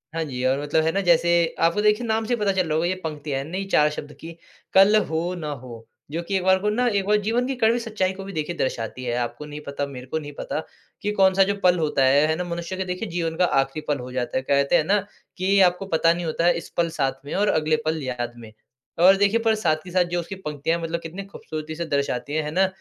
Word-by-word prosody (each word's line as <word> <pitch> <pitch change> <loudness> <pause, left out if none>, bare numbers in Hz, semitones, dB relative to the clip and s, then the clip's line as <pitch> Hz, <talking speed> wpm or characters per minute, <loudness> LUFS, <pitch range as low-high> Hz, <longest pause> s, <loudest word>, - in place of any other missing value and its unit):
हाँ 165 - 0
जी, 130 -3 -5
और 135 +2 +2
मतलब 145 +2 +1
है 160 - +2
ना 195 +3 0
जैसे, 170 -1 +3
आपको 170 +5 +2
देखिए 210 +3 +2
नाम 220 0 0
से 245 - -1
ही 235 - -1
पता 200 -1 +2
चल 185 -3 0
रहा 155 - 0
होगा 160 +2 +1
ये 185 - 0
पंक्ति 150 -2 -5
है, 135 0 -1
नई 190 +3 -3
4 150 0 +5
शब्द 150 -1 -7
की 165 +2 -8 0.4
"कल 195 +3 +7
हो 165 +3 -2
ना 155 -4 -5
हो।" 115 -3 -10 0.3
जो 165 +2 -2
कि 195 - -3
एक 185 - -2
बार 190 0 +4
को 210 - 0
ना 245 +4 +1
एक 200 -4 +1
बार 210 +1 +3
जीवन 230 +4 0
की 270 - -2
कड़वी 235 0 +2
सच्चाई 210 -5 -1
को 195 0 -8
भी 195 - -8
देखिए 160 +1 -3
दर्शाती 130 -1 -3
है। 120 - -2
आपको 125 +5 -3
नहीं 150 0 -8
पता, 140 0 -2
मेरे 130 -3 -9
को 160 - -2
नहीं 145 -1 -8
पता - - -3 0.4
कि 210 - -1
कौन-सा 195 -1 +4
जो 200 +1 0
पल 180 -1 +4
होता 150 -3 +1
है, 140 +3 +5
है 160 - +1
ना? 180 - -3
मनुष्य 170 +1 -5
के 190 - -2
देखिए 180 +4 -4
जीवन 165 -1 -2
का 180 - +4 0.2
आखरी 135 +3 -5
पल 145 - +1
हो 125 +1 -7
जाता 125 0 -2
है, - - 0
कहते 140 0 +2
हैं - - +4
ना, 200 +5 +2 0.4
कि 185 - -3
ये 195 0 +4
आपको 180 +2 -8
पता 165 +1 +4
नहीं 175 0 -4
होता 165 +1 -1
है, 175 - +5
इस 170 - -8
पल 170 -1 +2
साथ 135 0 -1
में 145 - -6
और 205 +2 +2
अगले 155 0 +2
पल 160 0 -1
याद 120 -2 -3
में। 115 -2 -11 0.5
और 190 +3 +7
देखिए, 205 +3 +3
पर 225 -1 +2
साथ 170 -7 +1
कि 180 - -10
साथ 180 0 +3
जो 175 0 -2
उसकी 170 +3 -6
पंक्तियाँ 160 -2 -2
मतलब 165 +1 -2
कितनी 175 +5 -7
खूबसूरती 155 -5 -7
से 170 +1 -3
दर्शाती 140 -2 -2
है। 155 -1 0
है 150 - -4
ना? 190 +4 +3
170 Hz, 275 wpm, -24 LUFS, 150-195 Hz, 0.5 s, कल